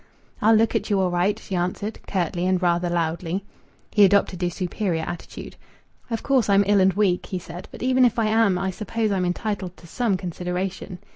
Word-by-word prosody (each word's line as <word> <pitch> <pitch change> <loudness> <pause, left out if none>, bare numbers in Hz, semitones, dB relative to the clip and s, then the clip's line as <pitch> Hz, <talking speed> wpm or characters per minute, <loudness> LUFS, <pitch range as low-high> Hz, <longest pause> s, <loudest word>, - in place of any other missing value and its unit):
"I'll 220 +2 +5
look 225 +1 +3
at 220 -2 -1
you 200 -2 +2
all 185 -1 +1
right," 180 +4 +1
she 195 - -9
answered, 180 +5 -2
curtly 180 -1 -1
and 185 -1 +2
rather 175 0 +1
loudly. 170 +2 -2 0.5
He 210 - +5
adopted 195 -2 +3
a 175 - +2
superior 175 -1 -2
attitude. 175 - -7 0.5
"Of 230 -2 -3
course 265 -6 +2
I'm 200 0 +5
ill 200 0 +4
and 190 0 +4
weak," 190 -2 +1
he 185 - -3
said, 175 0 -9
"but - - -8
even 255 0 +3
if 240 -2 +3
I 225 - +2
am 215 -3 +3
I 190 +1 -1
suppose 215 +3 -2
I'm 185 -2 0
entitled 185 0 -3
to - - -16
some 210 +2 0
consideration." 180 +1 -4
190 Hz, 200 wpm, -23 LUFS, 180-215 Hz, 0.5 s, I'll